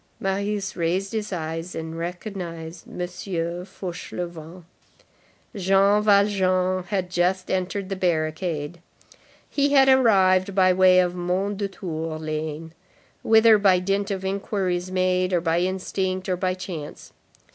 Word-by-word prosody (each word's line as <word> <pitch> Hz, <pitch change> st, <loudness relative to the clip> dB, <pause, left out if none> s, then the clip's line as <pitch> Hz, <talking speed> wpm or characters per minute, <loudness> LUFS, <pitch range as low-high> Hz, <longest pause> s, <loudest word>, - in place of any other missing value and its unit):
Marius 200 Hz, +1 st, -2 dB
raised 180 Hz, +3 st, -1 dB
his 215 Hz, -1 st, -3 dB
eyes 165 Hz, 0 st, -4 dB
and 160 Hz, 0 st, -5 dB
recognized 170 Hz, -1 st, -6 dB
M. 180 Hz, 0 st, -4 dB, 0.7 s
Fauchelevent. 175 Hz, -1 st, -7 dB, 0.9 s
Jean 195 Hz, +2 st, +3 dB
Valjean 190 Hz, -3 st, +2 dB
had 185 Hz, -2 st, -2 dB
just 180 Hz, +1 st, 0 dB
entered 190 Hz, +1 st, -2 dB
the 195 Hz, -, -2 dB
barricade. 160 Hz, -2 st, -2 dB, 0.7 s
He 285 Hz, 0 st, +1 dB
had 270 Hz, -1 st, +6 dB
arrived 195 Hz, -7 st, +4 dB
by 185 Hz, -1 st, +5 dB
way 185 Hz, 0 st, +5 dB
of 180 Hz, -1 st, +2 dB
Mondétour 180 Hz, -3 st, -3 dB
lane, 155 Hz, +1 st, -5 dB, 0.5 s
whither 220 Hz, -1 st, +6 dB
by 195 Hz, -2 st, +5 dB
dint 195 Hz, +3 st, -1 dB
of 190 Hz, -1 st, -3 dB
inquiries 190 Hz, -2 st, -2 dB
made, 185 Hz, 0 st, +1 dB
or 175 Hz, -, +3 dB
by 165 Hz, 0 st, +1 dB
instinct, 185 Hz, 0 st, -2 dB
or 185 Hz, 0 st, 0 dB
chance. 180 Hz, -5 st, -8 dB
185 Hz, 115 wpm, -24 LUFS, 175-195 Hz, 0.9 s, had